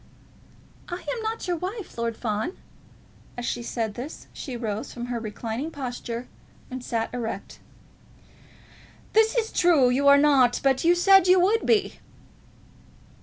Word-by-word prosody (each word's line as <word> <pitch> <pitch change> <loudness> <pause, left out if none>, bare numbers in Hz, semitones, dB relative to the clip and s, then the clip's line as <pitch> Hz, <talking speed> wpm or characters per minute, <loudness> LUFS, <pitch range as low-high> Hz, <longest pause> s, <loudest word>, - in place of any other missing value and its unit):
"I 350 - -3 0.2
am 460 - -5
not 445 -2 -3
your 350 -1 0
wife, 385 +4 -6
Lord 230 -1 -2
Fawn." 220 - -3 0.8
As 245 - -4
she 240 - -2
said 230 -2 -3
this, 255 +8 -8
she 260 -5 -6
rose 225 +1 -4
from 240 0 -6
her 235 - -2
reclining 230 +5 -4
posture 245 -4 -5 0.4
and 255 -1 -6
sat 230 -1 -2
erect. 225 -5 -5 1.5
"That 445 0 +5
is 445 -2 0
true. 310 -8 +4
You 280 +3 +2
are 280 0 +8
not. 275 -4 +4
But 270 -1 +2
you 345 +1 +5
said 385 +1 +6
you 365 0 +6
would 420 +5 +2
be." 425 -4 +2
265 Hz, 145 wpm, -25 LUFS, 235-355 Hz, 1.5 s, are